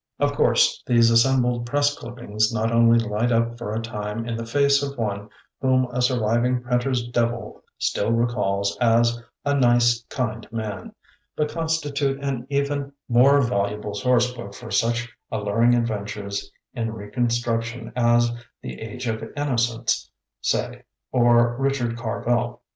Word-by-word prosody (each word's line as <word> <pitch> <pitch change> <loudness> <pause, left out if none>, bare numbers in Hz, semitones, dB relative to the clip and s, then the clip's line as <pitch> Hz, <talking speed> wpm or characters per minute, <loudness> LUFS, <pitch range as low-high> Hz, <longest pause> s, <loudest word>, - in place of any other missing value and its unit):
Of - - +2
course - - +3
these 115 -1 +5
assembled 120 0 +3
press 145 +2 +1
clippings 115 -3 -2
not 115 0 0
only 115 0 +5
light 115 +1 0
up 115 0 +1
for 105 -3 -4
a 110 - -1
time 105 0 -4
the 115 0 -5
face 140 +3 +3
of 140 -1 -4
one 105 -2 -3 0.3
whom 130 -1 +3
a 125 +1 -1
surviving 125 0 +1
printer's 125 0 0
devil 120 -1 -2
still 105 - 0
recalls 105 -4 0
as 120 0 +3 0.2
"a 145 - +2
nice, 120 -2 +3
kind 115 -4 -3
man", 105 -5 -5 0.4
but 150 -1 -1
constitute 145 -4 -1
an 135 -3 -3
even 140 0 +1
76 - - -6
THE 145 - -1
BOOKMAN 140 0 -8 0.3
more 140 +2 +6
valuable 105 -3 -1
sourcebook 120 -2 0
for 120 0 -10
such 120 +1 +1 0.2
al 110 -2 -2
luring 115 +4 +3
adventures 105 -3 -3 0.2
in 115 -3 -2
reconstruction 115 +1 -2
as 120 -1 +3 0.3
"The 65 0 -7
Age 115 +3 -6
of 110 -1 -2 0.2
Innocence", 120 -5 0 0.3
say, - - -1 0.3
or 120 -1 +4
"Rich 135 0 +1
ard 120 -1 -2
Carvel". 120 +1 -2
120 Hz, 150 wpm, -23 LUFS, 115-125 Hz, 0.4 s, more